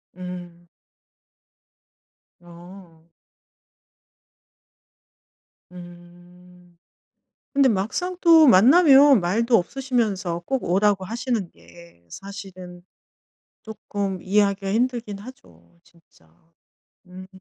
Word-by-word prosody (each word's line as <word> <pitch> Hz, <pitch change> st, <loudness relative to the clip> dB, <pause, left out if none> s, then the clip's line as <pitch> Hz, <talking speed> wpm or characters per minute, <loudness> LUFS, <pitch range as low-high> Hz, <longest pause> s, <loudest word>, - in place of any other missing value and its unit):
음. 175 Hz, -1 st, -10 dB, 1.7 s
어. 175 Hz, -1 st, -16 dB, 2.6 s
음 175 Hz, 0 st, -17 dB, 0.8 s
근데 275 Hz, -1 st, +3 dB
막상 225 Hz, -, -3 dB
또 325 Hz, -3 st, +6 dB
만나면 275 Hz, -, +6 dB
말도 230 Hz, +7 st, +1 dB
없으시면서 200 Hz, -6 st, -3 dB
꼭 265 Hz, -2 st, -3 dB
오라고 195 Hz, +2 st, 0 dB
하시는 230 Hz, -3 st, -4 dB
게 170 Hz, -, -20 dB
사실은 185 Hz, -, -11 dB, 0.8 s
쪼끔 200 Hz, -3 st, -6 dB
이해하기가 200 Hz, 0 st, 0 dB
힘들긴 235 Hz, -3 st, -2 dB
하죠. 85 Hz, -, -17 dB
진짜. 160 Hz, -, -28 dB, 0.8 s
음. 185 Hz, +1 st, -12 dB
190 Hz, 150 characters per minute, -22 LUFS, 175-230 Hz, 2.6 s, 또